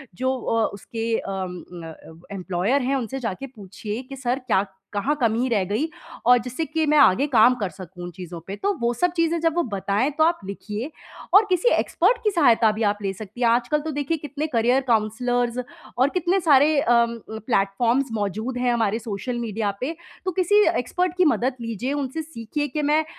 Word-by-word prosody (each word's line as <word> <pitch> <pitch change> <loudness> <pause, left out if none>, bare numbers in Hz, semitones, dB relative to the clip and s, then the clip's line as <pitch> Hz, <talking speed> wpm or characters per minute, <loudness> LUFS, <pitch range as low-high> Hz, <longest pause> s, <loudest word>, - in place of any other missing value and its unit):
जो 260 +6 0
अ, 225 -1 +1
उसके 225 +2 -3
अम 190 -2 -4 0.3
अ - - -7
अ, 160 0 -13 0.2
एम्प्लॉयर 190 +8 0
हैं, 265 +2 0
उनसे 265 +1 -3
जाके 235 +3 -4
पूछिए 205 +2 -6
कि 275 - -6
सर 260 -1 -1
क्या 200 -3 +2 0.3
कहाँ 235 +9 0
कमी 230 +2 +2
रह 210 -5 +2
गई 210 - -1 0.4
और 245 +1 +7
जिससे 255 +6 -3
कि 315 0 -1
मैं 300 - +4
आगे 270 -1 +5
काम 240 +3 +6
कर 205 -6 -3
सकूँ 180 -1 -10
उन 175 - -6
चीज़ों 175 -1 -8
पे? 195 - -4
तो 400 - 0
वो 235 0 +1
सब 355 +8 +1
चीज़ें 335 0 +1
जब 330 -1 +1
वो 345 - +2
बताएँ, 205 +4 0
तो 315 +3 +2
आप 335 +1 +2
लिखिए 210 +6 -5 0.4
और 415 +2 +8
किसी 365 +6 +3
एक्सपर्ट 400 +8 +2
की 425 - +2
सहायता 240 - +4
भी 220 +1 -3
आप 205 0 +2
ले 195 -1 -1
सकती 215 +4 -10
हैं। 235 - +4
आजकल 240 +5 +2
तो 315 +1 -4
देखिए, 290 +3 -1
कितने 295 +1 -4
करियर 245 0 +2
काउंसलर्स 240 +2 +1 0.4
और 260 +3 +4
कितने 365 +3 +1
सारे 295 -1 +5
अम 235 -4 +3
अ, 220 0 -9
प्लेटफ़ॉर्म्स 235 +5 +1
मौजूद 220 +4 -2
हैं 245 -1 +1
हमारे 225 -1 +1
सोशल 230 +3 -4
मीडिया 220 -3 -2
पे। 310 +6 -2 0.3
तो 370 - 0
किसी 380 +4 +3 0.2
एक्सपर्ट 360 +8 -1
की 365 - +4
मदद 260 -4 +2
लीजिए, 230 +4 -3
उनसे 285 +2 -3
सीखिए 290 -1 -4
कि 300 +2 -3
मैं 300 +2 +2
245 Hz, 200 wpm, -23 LUFS, 215-295 Hz, 0.4 s, और